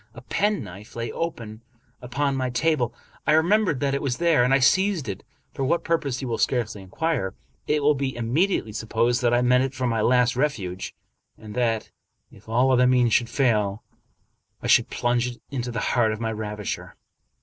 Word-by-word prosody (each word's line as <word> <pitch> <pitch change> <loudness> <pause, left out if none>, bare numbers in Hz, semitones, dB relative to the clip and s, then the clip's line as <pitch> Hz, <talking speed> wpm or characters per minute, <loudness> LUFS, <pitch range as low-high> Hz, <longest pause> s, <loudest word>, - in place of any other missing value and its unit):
A 120 - -10
penknife 115 - -2
lay 115 0 -3
open 115 -10 -5 0.4
upon 135 +3 -1
my 130 -1 -1
table. 125 -1 +1 0.4
I - - +5
remembered 175 -1 +3
that 140 -1 +1
it 140 - -1
was 130 -4 -1
there, 170 -7 +3
and 135 +1 +3
seized 190 - +3
it. 100 -3 -5 0.3
For 135 - -3
what 170 +6 +1
purpose 140 -6 -1
you - - -3
will 115 - -2
scarcely 115 -5 0
inquire. 95 - -2 0.3
It 150 -1 +1
will 150 +1 +5
be 135 -2 -2
imme 120 +11 +1
diately 110 - -2
supposed 115 +3 0
that 120 -1 +2
I 120 +1 +3
meant 125 +1 +4
it 135 0 -6
for 130 0 -2
my 115 -3 0
last 125 +2 +3
refuge, 100 -10 -2 0.4
and 105 -1 -10
that, 115 -2 -1 0.4
if 105 +2 -17
all 125 +4 +3
other 125 0 +4
means 125 -3 +3
should 120 -1 +2
fail, 110 -6 +1 0.8
I - - -10
should - - +4
plunge 120 0 0
it 120 -1 -8
into 125 -3 -3
the 120 -2 -3
heart 115 -3 +3
of 110 - -4
my 115 -1 -2
ravisher. 105 -1 -5
125 Hz, 190 wpm, -24 LUFS, 115-140 Hz, 0.8 s, I